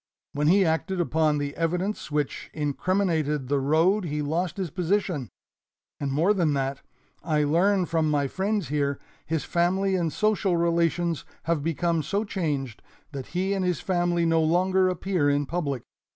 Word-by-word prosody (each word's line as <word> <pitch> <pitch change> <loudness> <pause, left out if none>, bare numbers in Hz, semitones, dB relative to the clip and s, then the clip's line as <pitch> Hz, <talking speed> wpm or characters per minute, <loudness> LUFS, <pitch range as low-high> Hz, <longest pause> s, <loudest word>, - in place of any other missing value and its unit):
When 150 +1 0
he 190 +3 +5
acted 175 +3 0
upon 160 -3 +2
the 145 0 -3
evidence 180 +5 -2
which 150 -1 -2
incriminated 150 -2 0
the 140 -1 +2
road 165 +8 +2
he 150 -1 -2
lost 165 +5 -1
his 185 -6 -3
position, 180 - -1 0.7
and 140 -2 -2
more 165 +9 +3
than 165 -7 +1
that, 135 0 -2 0.4
I 155 -3 +1
learn 180 +6 +3
from 165 -2 0
my 145 -2 +1
friends 195 - -1
here, 140 -2 0 0.3
his 160 -1 -1
family 190 +3 +1
and 170 -4 0
social 205 -2 +1
relations 170 -1 +1 0.2
have 165 -2 0
become 165 +1 0
so 200 +8 -1
changed 145 - -3 0.3
that 135 -3 -6
he 190 +2 +1
and 195 -1 -1
his 180 -2 0
family 175 -2 +1
no 165 0 +3
longer 185 +3 +3
appear 180 -4 0
in 145 0 +1
public. 140 -5 -2
165 Hz, 160 wpm, -26 LUFS, 150-185 Hz, 0.7 s, he